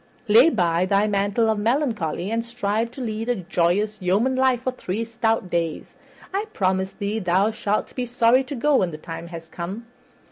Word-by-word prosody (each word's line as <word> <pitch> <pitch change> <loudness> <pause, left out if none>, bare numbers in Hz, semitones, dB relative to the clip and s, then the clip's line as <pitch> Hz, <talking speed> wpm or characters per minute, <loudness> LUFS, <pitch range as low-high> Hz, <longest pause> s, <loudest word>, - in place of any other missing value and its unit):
Lay 230 +9 +7
by 175 - +1
thy 200 +2 +3
mantle 205 +2 +1
of 220 -1 +1
melancholy, 220 - -1
and 230 0 0
strive 230 -1 -1
to 255 +3 -9
lead 225 0 -3
a 245 - +2
joyous 190 +3 0
yeoman 205 +9 +2
life 260 -2 +2
for 255 - 0
three 225 -3 -3
stout 225 -3 0
days. 165 -2 -2 0.4
I 400 +2 -1
promise 190 0 0
thee 205 +1 -3
thou 190 +2 +2
shalt 210 -1 -2
be 250 -1 -3
sorry 245 +2 +3
to 280 - -5
go 280 +3 +3
when 185 - +1
the 155 - -7
time 165 +2 -8
has 165 -1 -9
come." 185 +8 -6
215 Hz, 185 wpm, -23 LUFS, 185-235 Hz, 0.4 s, Lay